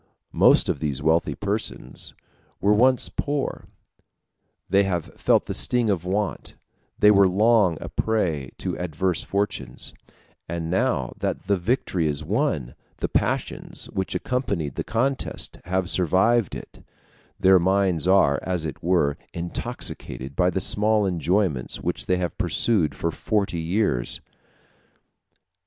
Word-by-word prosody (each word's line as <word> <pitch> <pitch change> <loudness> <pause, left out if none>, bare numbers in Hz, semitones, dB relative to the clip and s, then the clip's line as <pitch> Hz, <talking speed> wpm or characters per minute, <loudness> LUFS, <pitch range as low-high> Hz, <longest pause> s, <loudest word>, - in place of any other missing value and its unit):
Most - - +5
of - - -1
these 75 -3 -2
wealthy 80 +3 +1
persons 105 +2 -3 0.4
were 100 +4 +3
once 125 +4 +4
poor; 145 -1 -3 1.0
they 100 +2 +4
have 90 -5 -2
felt - - +2
the - - -4
sting 110 - +2
of 90 -3 -2
want; 100 +2 -2 0.4
they 105 - +6
were 100 -2 +6
long 100 -2 +3
a - - -6
prey 85 - -1
to - - -3
adverse 90 +1 -1
fortunes; 95 -11 -3 0.6
and 85 -1 -3
now 95 - 0
that - - -2
the 100 +1 +2
victory 90 -4 0
is 75 +1 -2
won, 90 - -1 0.2
the - - -2
passions - - -2
which 95 -1 -2
accompanied 100 - -2
the - - -3
contest 130 +4 -2
have 95 0 -1
survived 95 +5 +2
it: - - -11 0.6
their 95 -1 +6
minds 95 -2 +1
are, 95 -8 +4
as 90 -3 -2
it 75 - -6
were, 85 -5 +1 0.2
intoxicated 70 -5 -5
by 90 0 +3
the 90 - -1
small 105 +2 +2
enjoyments 90 -6 0
which - - -3
they 90 - +2
have 90 -1 -3
pursued 100 -10 +1
for 85 - -1
forty 100 0 -1
years. 80 - 0
95 Hz, 135 wpm, -24 LUFS, 80-105 Hz, 1.0 s, they